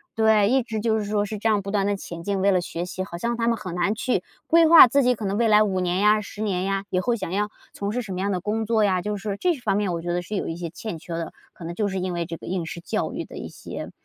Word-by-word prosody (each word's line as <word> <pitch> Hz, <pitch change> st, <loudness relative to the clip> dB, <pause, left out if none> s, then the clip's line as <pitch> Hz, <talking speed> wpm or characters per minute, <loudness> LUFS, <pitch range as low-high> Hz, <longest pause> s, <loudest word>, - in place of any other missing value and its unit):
对， 220 Hz, -2 st, +4 dB
一 260 Hz, +1 st, +3 dB
直 220 Hz, -2 st, -4 dB
就 220 Hz, -1 st, +1 dB
是 210 Hz, -, -3 dB
说 205 Hz, 0 st, 0 dB
是 210 Hz, +1 st, -4 dB
这 220 Hz, -, -1 dB
样 210 Hz, -2 st, +3 dB
不 200 Hz, +1 st, -5 dB
断 200 Hz, -1 st, +1 dB
地 205 Hz, -, +1 dB
前 170 Hz, -3 st, -8 dB
进， 200 Hz, 0 st, -1 dB
为 200 Hz, +1 st, +4 dB
了 185 Hz, -, +3 dB
学 170 Hz, -1 st, -4 dB
习， 185 Hz, +1 st, -4 dB
好 170 Hz, -3 st, -7 dB
像 235 Hz, +5 st, -2 dB
他 230 Hz, -, 0 dB
们 235 Hz, -, +3 dB
很 185 Hz, -5 st, -7 dB
难 180 Hz, +5 st, 0 dB
去 245 Hz, -4 st, 0 dB, 0.3 s
规 330 Hz, 0 st, +6 dB
划 330 Hz, 0 st, +11 dB
自 275 Hz, +3 st, +3 dB
己 250 Hz, -1 st, +3 dB
可 215 Hz, -, -8 dB
能 200 Hz, +1 st, -1 dB
未 235 Hz, -, +3 dB
来 215 Hz, 0 st, +6 dB
5 190 Hz, -3 st, 0 dB
年 180 Hz, 0 st, 0 dB
呀、 210 Hz, +1 st, +5 dB
10 210 Hz, 0 st, -8 dB
年 190 Hz, -3 st, -1 dB
呀， 195 Hz, 0 st, -1 dB
以 185 Hz, -, +1 dB
后 235 Hz, +5 st, +1 dB
想 190 Hz, -5 st, -5 dB
要 210 Hz, +2 st, 0 dB, 0.2 s
从 205 Hz, +1 st, -3 dB
事 250 Hz, -, -1 dB
什 215 Hz, -, -8 dB
么 180 Hz, -, -3 dB
样 200 Hz, +2 st, 0 dB
的 185 Hz, -2 st, -1 dB
工 215 Hz, +3 st, -1 dB
作 220 Hz, -1 st, +2 dB
呀， 185 Hz, -3 st, +2 dB
就 210 Hz, +1 st, -2 dB
是 200 Hz, 0 st, -4 dB
这 360 Hz, -, +2 dB
一 300 Hz, -, -3 dB
方 205 Hz, -, 0 dB
面 200 Hz, -4 st, 0 dB
我 165 Hz, -, -3 dB
觉 175 Hz, -, -3 dB
得 175 Hz, +1 st, 0 dB
是 195 Hz, +4 st, -6 dB
有 -, -, -2 dB
一 165 Hz, -, -4 dB
些 170 Hz, -1 st, -4 dB
欠 175 Hz, +3 st, -6 dB
缺 170 Hz, +1 st, -8 dB
的， 165 Hz, -1 st, -4 dB, 0.2 s
可 -, -, -12 dB
能 170 Hz, +1 st, -5 dB
就 205 Hz, +2 st, -1 dB
是 190 Hz, -1 st, -2 dB
因 185 Hz, -, -2 dB
为 170 Hz, -1 st, -2 dB
这 165 Hz, -, -6 dB
个 -, -, -11 dB
应 180 Hz, -2 st, -2 dB
试 170 Hz, +1 st, -7 dB
教 -, -, -2 dB
育 -, -, -3 dB
的 -, -, -11 dB
一 -, -, -6 dB
些 -, -, -8 dB
200 Hz, 345 characters per minute, -24 LUFS, 180-220 Hz, 0.3 s, 划